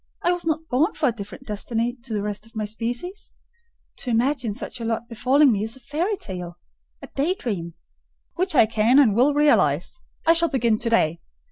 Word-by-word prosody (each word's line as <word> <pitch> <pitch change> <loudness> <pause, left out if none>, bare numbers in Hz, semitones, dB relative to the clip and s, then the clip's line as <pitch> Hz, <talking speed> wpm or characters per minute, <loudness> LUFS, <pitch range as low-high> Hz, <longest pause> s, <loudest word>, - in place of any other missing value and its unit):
I 350 - +3
was 355 -1 -2
not 320 0 -1
born 300 - +1
for 295 - +2
a - - 0
different 215 +3 -9
destiny 230 +2 -2
to - - -8
the 210 -2 -1
rest 210 +1 -4
of 225 - -23
my 215 -1 -2
species: 240 - -4 0.6
to 255 - -4
imagine 240 -1 +1
such 245 0 -5
a - - -3
lot 225 +1 -2
befalling 260 +4 +3
me 205 -2 0
is 225 +1 -2
a - - -14
fairy 345 - -2
tale—a 175 - -10
day 310 +7 +1
dream." 175 - -4 0.6
"Which 370 -1 -1
I 240 - +7
can 225 +3 +3
and 260 -8 +6
will 270 +5 +4
realise. 235 - +2 0.2
I 330 - +6
shall 335 0 +2
begin 235 -5 +1
to 235 - -1
day. 170 -8 +2
235 Hz, 200 wpm, -23 LUFS, 215-295 Hz, 0.6 s, I